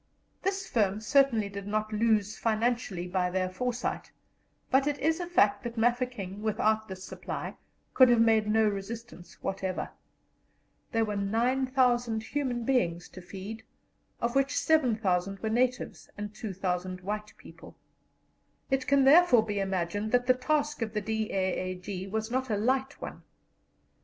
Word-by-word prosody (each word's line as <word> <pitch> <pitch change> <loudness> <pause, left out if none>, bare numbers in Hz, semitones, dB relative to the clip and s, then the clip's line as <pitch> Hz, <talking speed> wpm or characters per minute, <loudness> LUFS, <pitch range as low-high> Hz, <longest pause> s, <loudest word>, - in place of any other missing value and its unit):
This 390 0 -2
firm 205 -3 +1
certainly 235 -2 +3
did 200 0 -7
not 215 +1 -1
lose 215 -1 +2
financially 225 -5 -1
by 180 0 0
their 185 0 0
foresight, 245 +5 -3 0.6
but 270 +2 +4
it 290 -1 0
is 320 +4 +1
a 350 - -3
fact 210 -13 +3
that 235 -1 -6
Mafeking 240 -4 -1
without 220 0 +1
this 190 -1 -8
supply - - -6 0.4
could 255 -2 +7
have 240 -1 +5
made 225 -2 +4
no 220 0 +3
resistance 200 -3 -6
whatever. 190 -1 -3 1.0
There 225 -1 +2
were 210 -1 -3
9,000 240 +2 +1
human 255 -3 -2
beings 175 -10 0
to 185 - -11
feed, 195 +5 -8 0.6
of 235 0 -1
which 275 0 +2
7,000 215 - +2
were 220 - -3
natives 250 +2 -1
and 205 0 -5
2,000 185 -4 -3
white 210 +3 -5
people. - - -14 1.0
It 270 -1 +1
can 280 -1 +4
therefore 270 -5 +6
be 205 -2 -2
imagined 195 +2 -2
that 245 0 +3
the 255 - +5
task 295 +2 -1
of 220 -1 -3
the 210 - 0
D.A.A.G. 190 -3 -2
was 220 +3 -3
not 260 0 -1
a 210 - +1
light 265 +5 0
one. - - -7
220 Hz, 145 wpm, -29 LUFS, 195-250 Hz, 1.0 s, could